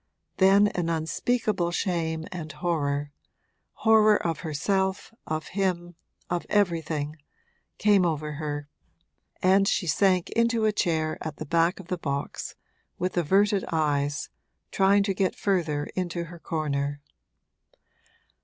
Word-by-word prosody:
Then 200 +2 +5
an 175 -3 -2
unspeakable 175 +4 0
shame 165 -3 -1
and 165 -4 -6
horror 145 -2 -1 0.7
horror 215 -1 +6
of 165 -2 -1
herself, 190 +6 -1
of 155 0 -3
him, 180 -3 -1 0.3
of 175 -1 -2
everything 165 -6 0 0.6
came 205 -3 +4
over 155 -3 -1
her, 145 -1 -4 0.8
and 195 +2 +5
she 195 - +1
sank 185 +2 +2
into 230 -1 +2
a 215 - +4
chair 160 -6 0
at 155 -2 -5
the 155 - -6
back 170 +4 +2
of 185 - -11
the 180 - -2
box, 140 -3 -4 0.4
with 185 +1 -2
averted 195 +4 +3
eyes, 145 -2 0 0.4
trying 200 +1 +4
to 200 -1 0
get 190 0 0
further 165 -7 0
into 175 -2 -2
her 170 0 -10
corner. 145 -3 -2
170 Hz, 125 wpm, -26 LUFS, 155-195 Hz, 0.8 s, horror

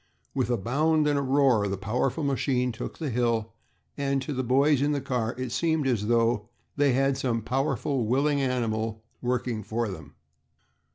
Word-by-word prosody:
With - - 0
a 120 - +2
bound 150 +8 +2
and 145 -1 +2
a - - 0
roar 130 -6 +3
the 100 0 -2
powerful 125 - -1
machine 130 -2 +1
took 120 +2 -7
the 155 -5 -3
hill, 115 -2 0 0.4
and 140 -1 0
to 145 - -4
the 130 - -1
boys 135 +3 +3
in 145 +1 +2
the 145 - 0
car 120 -3 -2
it 130 -2 -4
seemed 160 +1 +1
as 115 -6 0
though 115 -1 +2 0.3
they 145 -2 +3
had 135 +1 +1
some 115 -4 -1
powerful, 135 0 -1
willing 140 +4 +2
animal 110 -4 -1 0.2
working 125 -2 -1
for 110 +2 -2
them. 95 - -9
125 Hz, 175 wpm, -27 LUFS, 115-140 Hz, 0.4 s, roar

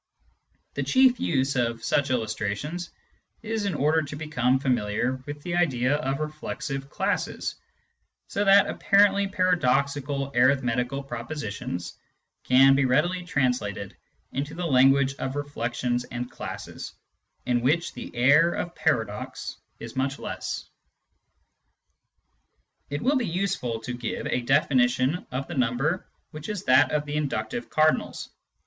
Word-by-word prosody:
The, - - -2
chief 260 -1 +4
use 135 -2 0
of 115 -2 -1
such 140 -1 +1
illustrations 120 - -2 0.5
is 220 -1 -2
in 200 - -1
order 155 +3 +2
to 145 -1 -6
become 135 -5 +1
familiar 125 -1 0
with 145 0 -7
the 175 -1 -2
idea 135 -6 +2
of 135 -1 -2
reflexive 150 -2 -5
classes, - - -2 0.7
so 205 - -1
that 200 0 +7
apparently 200 0 +3
paradoxical 140 -6 +1
arithmetical 125 +1 +2
propositions 120 - -5 0.5
can 135 +2 +6
be 135 0 +3
readily 175 +8 +1
translated 125 - -1 0.4
into 145 +3 -4
the 175 +1 -3
language 135 -1 +4
of 130 +1 -3
reflexions 125 -3 -2
and 120 +1 -6
classes, - - -7 0.5
in 120 -1 +1
which 155 +7 +1
the - - -7
air 145 +8 +5
of 175 - -4
paradox - - -2 0.2
is - - -8
much 135 +1 -1
less. - - -5 2.2
It 145 +1 -3
will 275 +3 +3
be 240 -4 -1
useful 165 -10 -1
to 125 +2 -5
give 120 -1 -4
a 125 - 0
definition 130 +2 +2
of 130 +2 -3
the 175 - -6
number 135 +6 0 0.2
which 155 +3 -8
is 205 -3 -3
that 130 -2 +5
of 150 -1 0
the 145 0 -3
inductive 190 - -3
cardinals. 155 0 +1
140 Hz, 130 wpm, -26 LUFS, 125-160 Hz, 2.2 s, that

